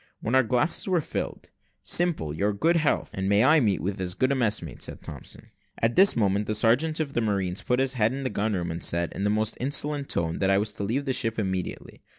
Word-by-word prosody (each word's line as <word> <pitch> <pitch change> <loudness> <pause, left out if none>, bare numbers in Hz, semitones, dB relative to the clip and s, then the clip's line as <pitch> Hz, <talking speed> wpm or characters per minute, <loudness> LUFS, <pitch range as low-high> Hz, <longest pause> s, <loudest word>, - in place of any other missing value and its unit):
When 115 - -3
our 130 - +6
glasses 125 - +1
were 185 -2 +2
filled 155 - -5 0.3
"Simple, 170 - +1
your 100 +6 0
good 165 +12 +1
health, 155 -4 0
and 95 0 -2
may 100 +1 +4
I 150 +4 +5
meet 105 - +1
with 95 +3 -3
as 90 -1 -2
good 130 +1 +1
a - - +1
messmate," 105 - -1
said - - -4
Thompson. - - -9 0.3
At 115 +1 0
this 195 +1 +7
moment, 100 -2 +1
the 110 - 0
sergeant 130 +9 +2
of 145 -3 -3
marines 100 -5 -1
put 125 - 0
his 135 -1 +1
head 110 -3 +1
in 135 +1 -5
at - - -5
the 130 - -2
gun 105 +1 -1
room 90 -2 -2
door, - - -3
and 85 +1 -5
said, 85 0 0
in 100 - -2
a - - +1
most 110 +1 0
insolent 145 +2 -1
tone, 80 -1 -2
that 95 - +1
I 95 - +4
was 105 +1 0
to 100 - -6
leave 125 +8 -2
the 135 - -1
ship 115 -3 -1
immediately. 95 -4 -4
110 Hz, 250 wpm, -26 LUFS, 100-135 Hz, 0.3 s, this